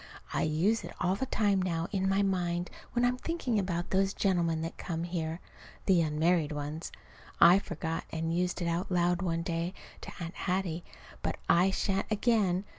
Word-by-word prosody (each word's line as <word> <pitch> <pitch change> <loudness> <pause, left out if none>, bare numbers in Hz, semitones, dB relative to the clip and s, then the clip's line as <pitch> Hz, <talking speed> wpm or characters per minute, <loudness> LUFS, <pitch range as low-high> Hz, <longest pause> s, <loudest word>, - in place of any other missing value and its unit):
I - - +1
use 170 +9 +2
it - - -8
all 180 +1 +2
the 265 +7 -2
time 205 -5 +2
now 170 -2 -1
in 190 -1 +1
my 195 +1 +3
mind 175 -2 0 0.2
when 245 0 +3
I'm 250 +1 +2
thinking 255 -7 -1
about 175 -3 -2
those 195 +1 +2
gentlemen 170 -5 +1
that 165 - -4
come 165 -2 -4
here 165 -1 -3 0.5
(the 185 -3 +5
unmarried 160 +1 +2
ones). 150 +2 -4 0.5
I 175 +3 +8
forgot 165 -4 -4
and 165 +1 -2
used 180 0 0
it - - -1
out 170 +3 -1
loud 175 0 +2
one 165 -2 -1
day 170 +2 -2 0.3
to - - -7
Aunt 170 0 -5
Hattie; 180 -3 -2 0.4
but - - -2
I 175 +3 +5
shan't 195 0 0
again. 210 -4 +2
175 Hz, 180 wpm, -31 LUFS, 165-195 Hz, 0.5 s, I